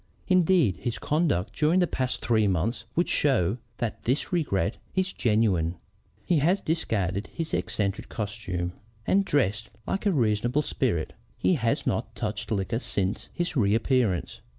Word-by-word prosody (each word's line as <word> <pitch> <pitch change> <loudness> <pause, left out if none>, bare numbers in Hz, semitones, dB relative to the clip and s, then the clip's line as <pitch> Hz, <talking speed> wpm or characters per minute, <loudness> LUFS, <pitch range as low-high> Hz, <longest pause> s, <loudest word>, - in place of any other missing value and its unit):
Indeed, 175 - +4
his 120 +3 -3
conduct 145 - 0
during 160 +4 +3
the 180 - +4
past 130 -6 -2
three 110 -3 +3
months 100 +6 0
would 175 - +2
show 125 - +2 0.2
that 115 -2 -3
this 130 +9 -1
regret 100 - 0 0.2
is 190 0 0
genuine. 100 -7 +2 0.5
He 175 -4 +3
has 175 +7 +3
discarded 105 - -1
his 165 -1 -5
eccentric 100 0 -1
costume, 95 -5 -3 0.3
and 200 +1 +3
dresses 110 - +1 0.2
like 200 +2 -1
a - - +4
reasonable 120 - +1
spirit. 85 - -1 0.2
He - - +2
has 115 -8 0
not - - -1
touched 105 0 -3
liquor 110 +2 0
since 100 -5 -2
his 175 -2 -2
reappearance. 110 -3 +1
115 Hz, 145 wpm, -27 LUFS, 100-155 Hz, 0.5 s, Indeed